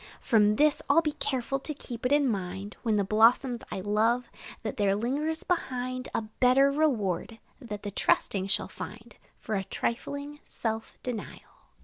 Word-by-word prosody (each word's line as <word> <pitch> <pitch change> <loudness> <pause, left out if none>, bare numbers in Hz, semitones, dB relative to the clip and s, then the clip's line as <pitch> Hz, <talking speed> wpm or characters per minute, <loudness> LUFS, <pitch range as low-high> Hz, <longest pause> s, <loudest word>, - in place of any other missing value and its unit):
From 210 -3 +4
this, 300 +4 +3
I 280 - +5
'll 330 - +7
be 305 - 0
careful 270 -2 -2
to 305 +2 -1
keep 245 -3 -4
it - - -5
in 290 -1 +4
mind, 195 -2 -3
When 225 -2 +1
the 205 - +2
blossoms 230 +4 +4
I 190 - -4
love, 225 +5 +1 0.3
that 215 - -4
there 200 -1 +2
lingers 290 +9 -1
behind 255 -7 -2
A - - 0
better 255 +5 +3
reward, 230 - 0 0.2
that 210 -6 -7
the 205 - -4
trusting 195 -1 +1
shall 195 - +2
find 220 +3 -9 0.2
For 220 - -5
a 195 -2 0
trifling 285 +8 -4
self 220 -1 -4
denial. 240 -4 -5
235 Hz, 165 wpm, -28 LUFS, 210-275 Hz, 0.3 s, ll